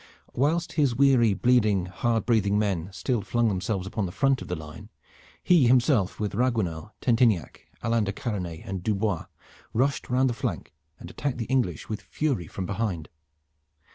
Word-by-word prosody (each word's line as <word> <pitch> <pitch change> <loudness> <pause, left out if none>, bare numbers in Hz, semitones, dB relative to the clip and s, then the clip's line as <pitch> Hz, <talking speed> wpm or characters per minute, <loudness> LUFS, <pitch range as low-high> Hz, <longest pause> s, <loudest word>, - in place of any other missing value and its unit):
Whilst 160 +6 +1
his 140 -6 +2
weary, 125 -6 +4
bleeding, 110 -7 +3
hard 115 +5 -1
breathing 105 -4 +2
men 95 -4 -1
still 120 +4 -1
flung 120 +3 +1
themselves 95 0 -2
upon 95 0 -2
the - - -6
front 135 +6 +1
of - - -7
the 90 - -2
line, 75 0 -10 0.5
he 165 -8 +5
himself 120 -5 +3
with 105 -1 -2
Raguenel, 105 -7 -1
Tentiniac, 115 - +1 0.2
Alain 115 -2 +1
de 100 - -1
Karanais, 95 -7 -4
and 95 -1 -4
Dubois 100 -3 -1 0.5
rushed 135 +5 0
round 130 +2 +3
the 125 - 0
flank 70 - -4 0.2
and - - -10
attacked 140 -4 -3
the 115 - -3
English 120 - -1
with 110 - -4
fury 135 - -2
from 95 - -5
behind. 95 -6 -3
110 Hz, 165 wpm, -26 LUFS, 95-125 Hz, 0.5 s, he